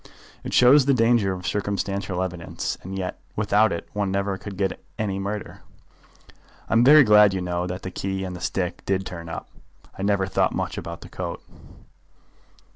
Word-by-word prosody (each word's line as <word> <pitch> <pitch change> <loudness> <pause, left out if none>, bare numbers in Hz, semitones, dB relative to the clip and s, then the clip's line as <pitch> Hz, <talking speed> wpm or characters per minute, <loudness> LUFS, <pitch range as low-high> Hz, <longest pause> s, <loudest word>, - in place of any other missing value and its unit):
"It - - -5
shows 130 +2 +6
the 140 - +4
danger 115 -4 +3
of 90 -1 -6
circumstantial 100 -2 -2
evidence, 90 -3 -4
and 95 +1 -6
yet 90 -1 -4 0.2
without 105 0 +3
it 85 - -4
one 105 -1 -1
never 100 0 -1
could 100 0 -8
get 95 -2 +1
at - - -9 0.2
any 100 -3 -2
murder. 100 +1 -5 1.1
I'm 115 +2 +4
very 150 +3 +8
glad, 105 -3 +6
you 95 - -2
know, 90 0 -2
that 90 +1 -5
the 95 - -5
key 95 +1 -3
and 90 -1 -5
the 90 - -9
stick 85 0 -2
did 95 0 0
turn 85 -3 -7
up. - - -7 0.4
I - - -8
never 100 -1 +1
thought 95 - +1
much - - -2
about - - -7
the - - -11
coat." - - -5
95 Hz, 185 wpm, -24 LUFS, 95-105 Hz, 1.1 s, very